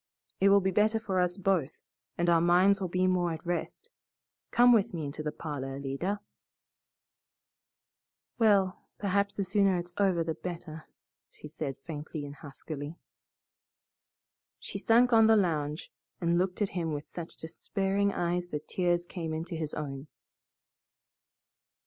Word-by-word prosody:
It 195 - +5
will 200 0 +6
be 190 0 +1
better 215 +3 +3
for 195 -4 -1
us 180 +1 +1
both, 185 -7 0 0.3
and 175 - +1
our 170 -1 +5
minds 185 +3 +4
will 185 - 0
be 180 +1 +1
more 180 -2 +1
at 160 +1 -8
rest. 175 - -4 0.6
Come 245 +1 +6
with 205 -5 +2
me 160 -3 -3
into 140 +2 -5
the 150 0 -2
parlor, 135 -4 -5
Alida." 140 +9 -3 2.2
"Well, 200 -4 +3
perhaps 200 0 0
the 200 - -1
sooner 195 -1 +3
it's 175 0 -5
over 185 -4 +3
the 160 0 -2
better," 165 -2 -7 0.4
she - - -12
said 150 -3 -4
faintly 155 -1 -5
and 140 - -8
huskily. 145 +2 -8 1.6
She - - -7
sunk 240 +1 +4
on 225 -1 +7
the 225 - +6
lounge 155 -5 -1 0.3
and 170 0 +2
looked 185 +3 0
at 200 - -1
him 165 -3 -2
with 145 0 -5
such 170 -1 -7
despairing 195 +4 -1
eyes 175 -1 -1
that 150 -3 -5
tears 175 -1 +1
came 165 -3 -4
into 165 +3 -5
his 160 -2 -3
own. 140 -1 -5
175 Hz, 150 wpm, -30 LUFS, 155-195 Hz, 2.2 s, on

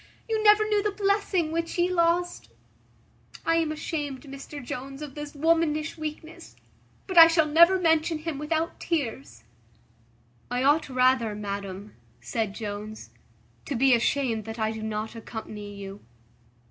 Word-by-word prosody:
you 445 -1 0
never 425 0 +6
knew 420 -1 +2
the 420 - 0
blessing 400 -5 0
which 335 +1 -2
ye 350 0 +3
lost. 350 0 0 1.0
I 330 0 +3
am 325 -2 +1
ashamed, 295 -3 -4
Mr 275 +1 -9
Jones, 270 +3 -6
of 290 -3 -8
this 295 0 -8
womanish 315 0 +1
weakness; 315 +1 -8 0.5
but 375 -3 +4
I 330 - +12
shall 330 -1 +3
never 340 +5 +6
mention 325 -1 +2
him 310 -2 -5
without 320 +2 -2
tears." 280 -6 -3 1.1
"I 245 +1 -1
ought 290 +2 +3
rather, 255 -4 +2
madam," 200 -1 -6 0.3
said 200 - -3
Jones, 215 0 -7 0.5
"to 285 - -3
be 260 +2 +4
ashamed 235 -2 +1
that 225 0 -7
I 220 -1 0
do 220 0 -6
not 215 0 -4
accompany 215 -2 -8
you." 195 0 -8
295 Hz, 145 wpm, -26 LUFS, 225-330 Hz, 1.1 s, I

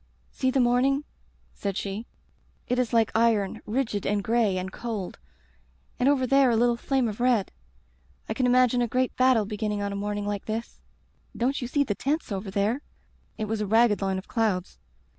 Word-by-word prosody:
"'See 260 - 0
the 265 - +1
morning,' 255 +3 +3 0.5
said 200 -1 -3
she. 205 +4 -4 0.6
*It 250 +1 0
is 250 -2 0
like 230 -2 +3
iron 220 -4 +2
— - - -34
^rigid 220 -4 -1
and 205 -1 0
gray 220 -4 +2
and 185 +1 -4
cold 215 -6 -5 0.4
— - - -37
^and 250 - +2
over 275 -2 +3
there 275 0 +4
a 235 - +2
little 240 +1 +3
flame 260 +1 0
of 215 0 -5
red. 240 -5 +2 0.8
I - - -2
can 255 -2 +1
imagine 250 0 +4
a 240 - +1
great 255 +2 0
battle 255 -4 +4
beginning 210 0 -2
on 200 - -2
a - - -4
morning 205 0 -3
like 205 -1 -3
this. 225 +2 -5 0.6
Don't 260 +4 0
you 245 - -3
see 285 +3 +2
the 225 - -1
tents 285 +4 -2
over 195 0 -3
there 205 +7 0 0.2
— - - -37
' - - -38
It 215 - -2
was 215 0 -2
a 210 - -1
ragged 225 0 +4
line 195 -1 0
of 190 - -7
clouds. 210 -6 -1
225 Hz, 205 wpm, -26 LUFS, 205-250 Hz, 0.8 s, there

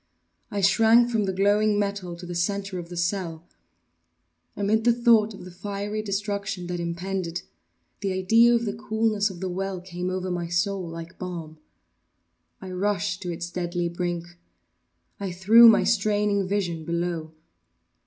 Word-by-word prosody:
I 205 - -2
shrank 225 +4 +5
from 220 -3 +1
the 190 - 0
glowing 205 +2 +2
metal 200 -4 -2
to 175 +1 -10
the 175 - -6
centre 195 +2 -2
of 170 -1 -8
the 175 - -7
cell. 170 -2 -2 1.1
Amid 210 +2 +1
the 240 - +5
thought 230 -3 +3
of 180 - -11
the 185 - -10
fiery 205 +3 -4
destruction 200 -2 -3
that 175 0 -4
impended, 170 +1 -3 0.6
the 195 -1 -2
idea 225 +6 +5
of 235 0 0
the 205 - -2
coolness 220 -1 0
of 185 -2 -10
the 190 - -2
well 190 +1 -3
came 180 0 -5
over 185 0 -3
my 175 -1 -2
soul 180 +1 -1
like 165 +1 -9
balm. 165 -4 -6 1.0
I 190 -1 -8
rushed 195 0 -1
to 180 - -3
its 170 +1 -5
deadly 175 -1 -2
brink. 175 0 -3 0.9
I 195 -2 -3
threw 215 +7 +7
my 220 - +5
straining 205 -2 +1
vision 180 -5 -1
below. 170 -1 -3
190 Hz, 155 wpm, -25 LUFS, 175-205 Hz, 1.1 s, threw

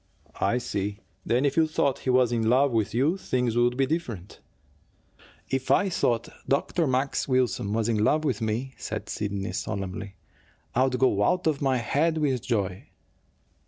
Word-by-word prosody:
"I 120 - +2
see. 100 -4 -3 0.3
Then, 125 +4 +1
if 140 - +1
you 160 -1 +4
thought 140 -3 0
he - - -4
was 125 -1 +4
in 115 -2 +1
love 135 +3 +4
with 110 -3 0
you, 140 - +1
things 125 -9 -1
would 120 +1 +2
be 135 - +3
different?" 125 - -4 1.1
"If 135 0 -1
I 200 - +4
thought 120 -9 0 0.2
Dr. 155 +4 +1
Max 130 +2 0
Wilson 130 -6 +1
was 110 0 0
in 110 -2 +1
love 155 +7 +2
with 130 -8 -1
me," 115 +5 -2
said - - -5
Sidney 100 -1 -3
solemnly, 100 +1 -4 0.6
"I'd 130 +1 +2
go 115 -6 +3
out 180 - +1
of 155 -3 +1
my 135 -2 +2
head 155 +7 +1
with 135 -5 0
joy." 100 -6 -2
125 Hz, 165 wpm, -26 LUFS, 110-140 Hz, 1.1 s, you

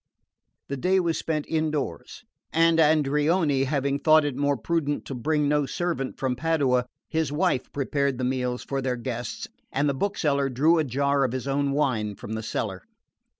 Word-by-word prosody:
The 140 - -3
day 185 +7 +2
was 165 -3 0
spent 155 -2 -2
indoors, 155 -3 -2 0.3
and 165 0 +4
Andreoni 150 -1 +3
having 140 0 0
thought 155 0 +5
it 145 -3 -2
more 140 0 +1
prudent 145 +3 -1
to - - -6
bring 150 +4 0
no 145 -1 +2
servant 165 -2 -2
from 130 -2 -1
Padua, 135 -6 +1 0.2
his 160 -3 -1
wife 155 -3 0
prepared 140 -1 -1
the 130 - -3
meals 125 -1 -1
for 135 -1 -3
their 130 -1 -1
guests 120 -1 -5 0.2
and 145 +2 +1
the 140 - +1
bookseller 140 -5 0
drew 155 +7 +3
a - - +3
jar 140 +1 +1
of 130 -2 0
his 130 +1 -4
own 140 0 0
wine 120 -8 0
from 105 - -7
the 110 - -3
cellar. 100 -3 -3
140 Hz, 175 wpm, -26 LUFS, 130-155 Hz, 0.3 s, thought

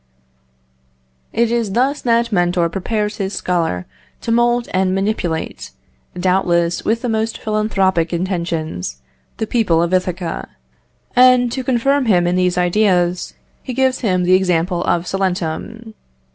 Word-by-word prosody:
It 235 0 +1
is 230 -4 -1
thus 270 +5 +1
that 235 -1 +1
Mentor 175 -2 +1
prepares 210 +4 -2
his 195 -1 -3
scholar 165 - -1 0.4
to 230 - -3
mould 240 +1 +2
and 185 0 +1
manipulate, 195 - -2 0.5
doubtless 175 -2 +1
with 230 +2 0
the - - 0
most 220 0 -1
philanthropic 195 -6 0
intentions, 170 - -3 0.4
the 220 - -1
people 195 -8 +2
of 170 +1 -2
Ithaca, 180 -2 -2 0.7
and, 250 -1 +5
to 260 +1 -3
confirm 260 +2 +1
him 180 -5 +3
in 175 +1 +1
these 180 -1 +1
ideas, 180 -1 +1 0.3
he 255 - -6
gives 260 0 +2
him 185 -6 +1
the 180 +1 +3
example 180 -1 +1
of 170 0 +1
Salentum. 195 +4 -3
190 Hz, 130 wpm, -18 LUFS, 175-230 Hz, 0.7 s, and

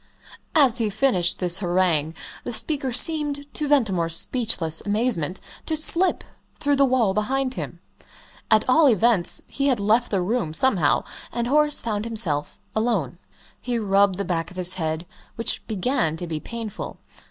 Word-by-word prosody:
As 265 -6 +4
he 220 -2 0
finished 195 -7 +1
this 180 0 +1
harangue 175 -4 0 0.3
the - - -5
speaker 275 +2 -1
seemed, 290 +2 +2
to 300 - -1
Ventimore's 190 - +1
speechless 180 -11 0
amazement, 205 -5 -1 0.3
to 315 - 0
slip 340 +4 +5 0.4
through 285 -1 +1
the 275 - +4
wall 245 -7 +1
behind 255 +6 -1
him. - - -7 0.7
At 215 -1 +3
all 295 +4 +5
events, 220 -5 +4
he 275 0 -2
had 255 -5 +1
left 220 +4 +1
the 195 - 0
room 180 -6 -2
somehow 190 - +2 0.3
and 235 0 -2
Horace 295 +3 +2
found 215 -2 -3
himself 190 -11 0 0.2
alone. 205 - -1 0.4
He 245 -1 -2
rubbed 200 -3 +2
the 200 - -3
back 165 -2 -2
of 185 - -14
his 180 0 -1
head, 160 -2 -3 0.3
which 230 - -3
began 190 - -1
to 175 - -5
be 160 -2 -4
painful. 230 +2 -7
215 Hz, 155 wpm, -23 LUFS, 180-255 Hz, 0.7 s, slip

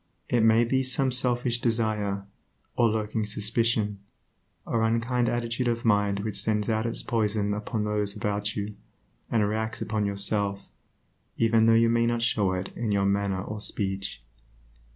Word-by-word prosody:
It 120 - +2
may 115 +1 +5
be 130 +3 +1
some 130 0 +2
selfish 120 -1 +1
desire, 105 -4 0 0.5
or 120 -1 +4
lurking 110 0 -1
suspicion, 105 0 0 0.7
or 115 - 0
unkind 115 +2 +1
attitude 120 +1 -1
of 115 0 -1
mind 100 -2 +2
which 100 -1 -2
sends 105 -1 0
out 110 +1 0
its 115 - -3
poison 105 -3 0
upon 105 +1 -3
those 105 -1 -1
about 105 0 -2
you, 105 0 -3 0.6
and 110 -3 +2
reacts 110 +1 -2
upon 105 -1 -1
yourself, 100 0 -1 0.8
even 115 0 +4
though 115 - +6
you 115 0 +5
may 115 0 +2
not 120 0 0
show 105 -5 +1
it 90 +1 -4
in 115 -3 -2
your 100 -1 +2
manner 100 -1 0
or 105 +1 -6
speech. 95 - -3
110 Hz, 155 wpm, -27 LUFS, 105-115 Hz, 0.8 s, though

